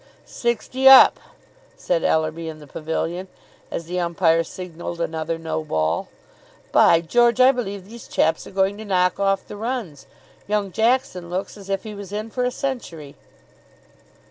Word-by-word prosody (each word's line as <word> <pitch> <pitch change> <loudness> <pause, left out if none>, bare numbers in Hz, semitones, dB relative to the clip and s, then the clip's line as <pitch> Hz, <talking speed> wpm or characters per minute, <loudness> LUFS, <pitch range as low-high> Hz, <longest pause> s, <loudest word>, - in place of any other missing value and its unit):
"Sixty 250 +3 +1
up," 270 - +9 0.6
said - - -1
Ellerby, 160 +1 0
in 155 - -8
the 150 - -13
pavilion, 165 +5 -4 0.4
as 170 - -5
the 180 +2 -3
umpire 170 -1 +2
signalled 175 0 -7
another 165 0 -2
no 160 -1 -3
ball. 80 - -1 0.6
"By 165 - +5
George! 240 +8 +2
I 255 +1 +7
believe 200 -7 -5
these 230 +3 -12
chaps 160 +1 0
are - - -9
going 195 +1 0
to 220 - -7
knock 180 -2 +1
off 195 -1 0
the 205 - -8
runs. 210 - -5 0.4
Young 205 -2 -1
Jackson 220 -5 0
looks 185 +2 -4
as 200 -2 -12
if 195 -1 -1
he 215 -2 -7
was 200 -2 -9
in 215 +2 -5
for 250 - -2
a 250 - +2
century." 205 - -5
190 Hz, 160 wpm, -22 LUFS, 165-225 Hz, 0.6 s, up